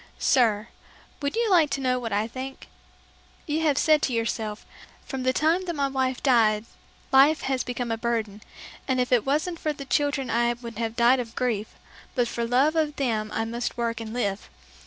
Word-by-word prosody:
"Sir, 225 Hz, -4 st, +2 dB, 0.5 s
would 280 Hz, +5 st, -2 dB
you 465 Hz, 0 st, +1 dB
like 330 Hz, -5 st, +5 dB
to 275 Hz, -, -2 dB
know 255 Hz, -1 st, +1 dB
what 230 Hz, -2 st, -5 dB
I 205 Hz, +2 st, +1 dB
think? 265 Hz, +3 st, -8 dB, 0.8 s
You 310 Hz, 0 st, -1 dB
have 300 Hz, -4 st, +2 dB
said 310 Hz, -1 st, +4 dB
to 260 Hz, -, 0 dB
yourself, 225 Hz, -2 st, -2 dB, 0.4 s
'From 265 Hz, -2 st, -5 dB
the 255 Hz, 0 st, +2 dB
time 325 Hz, +7 st, +1 dB
that 345 Hz, -2 st, -3 dB
my 280 Hz, -1 st, 0 dB
wife 260 Hz, -1 st, -1 dB
died 225 Hz, -5 st, +3 dB, 0.5 s
life 280 Hz, +3 st, +6 dB
has 265 Hz, -1 st, 0 dB
become 245 Hz, -1 st, -3 dB
a 225 Hz, -, -2 dB
burden, 225 Hz, -3 st, -2 dB, 0.5 s
and 260 Hz, -1 st, +1 dB
if 250 Hz, 0 st, 0 dB
it 245 Hz, -1 st, +3 dB
wasn't 315 Hz, +5 st, 0 dB
for 305 Hz, -, -1 dB
the 275 Hz, -1 st, -8 dB
children 285 Hz, -2 st, 0 dB
I 235 Hz, +1 st, +2 dB
would 235 Hz, -2 st, -9 dB
have 225 Hz, -1 st, -2 dB
died 240 Hz, +2 st, +4 dB
of 230 Hz, -2 st, -6 dB
grief, 225 Hz, -4 st, -2 dB, 0.4 s
but 245 Hz, -1 st, +2 dB
for 235 Hz, 0 st, -3 dB
love 270 Hz, +6 st, +3 dB
of 305 Hz, -2 st, +1 dB
them 225 Hz, -6 st, -1 dB
I 225 Hz, -, -1 dB
must 235 Hz, +2 st, -4 dB
work 230 Hz, -1 st, -2 dB
and 220 Hz, -1 st, -6 dB
live. 205 Hz, -4 st, -2 dB
250 Hz, 200 wpm, -25 LUFS, 230-280 Hz, 0.8 s, life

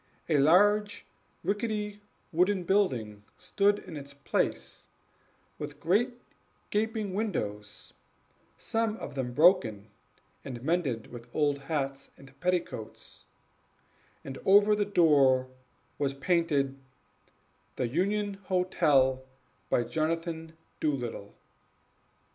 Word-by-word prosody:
A 150 Hz, -3 st, +4 dB
large, 205 Hz, +8 st, +4 dB, 0.4 s
rickety 210 Hz, 0 st, -2 dB, 0.3 s
wooden 180 Hz, +3 st, +2 dB
building 125 Hz, -, 0 dB, 0.2 s
stood 200 Hz, +3 st, +2 dB
in 175 Hz, -, -10 dB
its 140 Hz, -1 st, -9 dB
place, 140 Hz, -, -2 dB, 0.7 s
with 145 Hz, -1 st, -7 dB
great 240 Hz, +9 st, +1 dB, 0.5 s
gaping 215 Hz, -2 st, -1 dB
windows, 105 Hz, -, -4 dB, 0.6 s
some 225 Hz, -1 st, -1 dB
of -, -, -7 dB
them 130 Hz, -3 st, -3 dB
broken 120 Hz, -, +3 dB, 0.5 s
and 125 Hz, -2 st, -7 dB
mended 145 Hz, -8 st, -1 dB
with 120 Hz, 0 st, -10 dB
old 145 Hz, -2 st, +2 dB
hats 140 Hz, -1 st, -3 dB
and 135 Hz, 0 st, -15 dB
petticoats, 175 Hz, -10 st, -3 dB, 1.0 s
and 135 Hz, -1 st, -7 dB
over 205 Hz, +2 st, +6 dB
the 205 Hz, 0 st, +1 dB
door 140 Hz, -9 st, +4 dB, 0.5 s
was 140 Hz, -1 st, 0 dB
painted, 140 Hz, -4 st, +1 dB, 1.0 s
"The 125 Hz, -, -1 dB
Union 200 Hz, -, -1 dB
Hotel, 150 Hz, -8 st, +2 dB, 0.5 s
by 120 Hz, -, +2 dB
Jonathan 165 Hz, +2 st, -3 dB, 0.2 s
Doolittle." 125 Hz, -9 st, -3 dB
160 Hz, 95 wpm, -29 LUFS, 135-200 Hz, 1.0 s, over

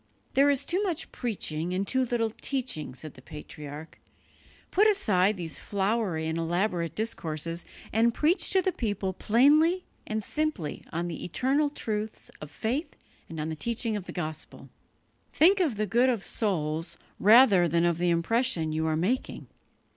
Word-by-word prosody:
"There 280 Hz, +2 st, +5 dB
is 280 Hz, 0 st, +1 dB
too 365 Hz, +3 st, 0 dB
much 360 Hz, -7 st, -2 dB
preaching 180 Hz, -7 st, -3 dB
and 195 Hz, +1 st, -1 dB
too 260 Hz, +4 st, +1 dB
little 230 Hz, -2 st, 0 dB
teaching," 240 Hz, -, -3 dB
said 150 Hz, +3 st, -9 dB
the 130 Hz, -, -15 dB
patriarch; 150 Hz, +1 st, -10 dB, 0.7 s
"put 420 Hz, +3 st, +5 dB
aside 210 Hz, -, +2 dB
these 165 Hz, -5 st, -4 dB
flowery 200 Hz, -5 st, -1 dB
and 160 Hz, +1 st, -2 dB
elaborate 175 Hz, 0 st, -1 dB
discourses, 165 Hz, -6 st, -2 dB, 0.3 s
and 230 Hz, +2 st, +4 dB
preach 310 Hz, -, +1 dB
to 380 Hz, -2 st, +2 dB
the 375 Hz, -, +1 dB
people 205 Hz, -, -2 dB
plainly 300 Hz, -, +3 dB, 0.2 s
and 215 Hz, 0 st, -2 dB
simply 300 Hz, -, -3 dB
on 170 Hz, +2 st, -2 dB
the 165 Hz, -3 st, -5 dB
eternal 270 Hz, -, +1 dB
truths 215 Hz, -5 st, -4 dB
of 150 Hz, -, -7 dB
faith 245 Hz, -, -3 dB, 0.3 s
and 165 Hz, -1 st, -6 dB
on 155 Hz, +1 st, -2 dB
the 160 Hz, -, -3 dB
teaching 230 Hz, +6 st, -2 dB
of 200 Hz, -3 st, -5 dB
the -, -, -5 dB
Gospel. 155 Hz, -3 st, -6 dB, 0.6 s
Think 380 Hz, +5 st, +5 dB
of 315 Hz, -, +1 dB
the 215 Hz, -, 0 dB
good 240 Hz, +6 st, +3 dB
of 230 Hz, -6 st, -1 dB
souls 165 Hz, -6 st, -2 dB, 0.2 s
rather 210 Hz, -4 st, +7 dB
than 170 Hz, +1 st, +2 dB
of 170 Hz, -1 st, +1 dB
the 175 Hz, 0 st, +2 dB
impression 170 Hz, 0 st, +1 dB
you 160 Hz, +1 st, 0 dB
are 155 Hz, 0 st, +1 dB
making. 215 Hz, +11 st, -2 dB
205 Hz, 160 wpm, -28 LUFS, 165-255 Hz, 0.7 s, rather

